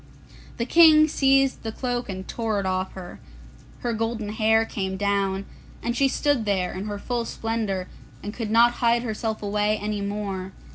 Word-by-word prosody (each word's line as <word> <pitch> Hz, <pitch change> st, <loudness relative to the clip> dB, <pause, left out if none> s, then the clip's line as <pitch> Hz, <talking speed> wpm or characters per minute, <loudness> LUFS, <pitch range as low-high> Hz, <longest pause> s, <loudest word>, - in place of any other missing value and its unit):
The 235 Hz, -, -1 dB
King 310 Hz, +1 st, +7 dB
seized 270 Hz, -2 st, +2 dB
the 225 Hz, -, -4 dB
cloak 245 Hz, 0 st, -3 dB
and 190 Hz, -1 st, -6 dB
tore 220 Hz, -3 st, -1 dB
it 195 Hz, -, -3 dB
off 185 Hz, 0 st, -1 dB
her. 185 Hz, -2 st, -9 dB, 0.6 s
Her 240 Hz, -1 st, -1 dB
golden 225 Hz, -1 st, -2 dB
hair 220 Hz, +1 st, +2 dB
came 190 Hz, -3 st, -3 dB
down, 200 Hz, -1 st, 0 dB, 0.4 s
and 235 Hz, 0 st, -1 dB
she 275 Hz, +2 st, +3 dB
stood 285 Hz, -2 st, +1 dB
there 190 Hz, -3 st, 0 dB
in 190 Hz, +2 st, -5 dB
her 205 Hz, -1 st, -4 dB
full 240 Hz, +3 st, -2 dB
splendour, 220 Hz, -5 st, -3 dB, 0.4 s
and 205 Hz, -, -5 dB
could 225 Hz, -3 st, -4 dB
not 235 Hz, +2 st, +5 dB
hide 235 Hz, 0 st, +3 dB
herself 220 Hz, -1 st, -3 dB
away 210 Hz, +1 st, +1 dB
any 210 Hz, 0 st, -3 dB
more. 200 Hz, -2 st, -4 dB
215 Hz, 175 wpm, -24 LUFS, 200-235 Hz, 0.6 s, King